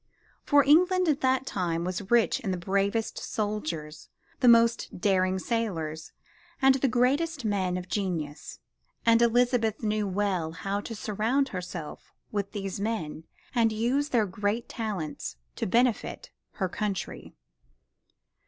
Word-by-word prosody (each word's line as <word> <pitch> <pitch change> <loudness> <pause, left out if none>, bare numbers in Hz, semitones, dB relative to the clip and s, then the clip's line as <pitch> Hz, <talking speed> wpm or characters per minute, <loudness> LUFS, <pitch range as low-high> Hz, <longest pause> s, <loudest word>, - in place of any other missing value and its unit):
For 290 -1 +4
England 360 +6 +4
at 300 -1 +1
that 260 0 +2
time 170 -7 -1
was 185 +2 -4
rich 235 -2 +3
in 205 - -4
the 185 - -1
bravest 200 +5 0
soldiers, 165 -8 -4 0.3
the 250 - +3
most 230 -4 +4
daring 185 -1 +2
sailors 170 -8 -3 0.5
and 270 -1 +6
the 270 +1 +1
greatest 270 +4 +1
men 190 -4 0
of 180 0 -6
genius, 175 -6 -3 0.5
and 230 0 +5
Elizabeth 235 -2 +2
knew 210 -1 0
well 185 -4 -1
how 195 +4 -2
to 225 - -7
surround 225 +7 0
herself 180 -4 -7 0.2
with 200 -2 -2
these 195 -2 -4
men 195 -8 -3 0.3
and 230 -3 +3
use 250 +7 0
their 230 -6 +3
great 205 +5 -2
talents 185 - -4 0.2
to - - -2
benefit 240 +3 0 0.2
her 190 - -1
country. 200 0 -4
210 Hz, 135 wpm, -28 LUFS, 185-240 Hz, 0.5 s, and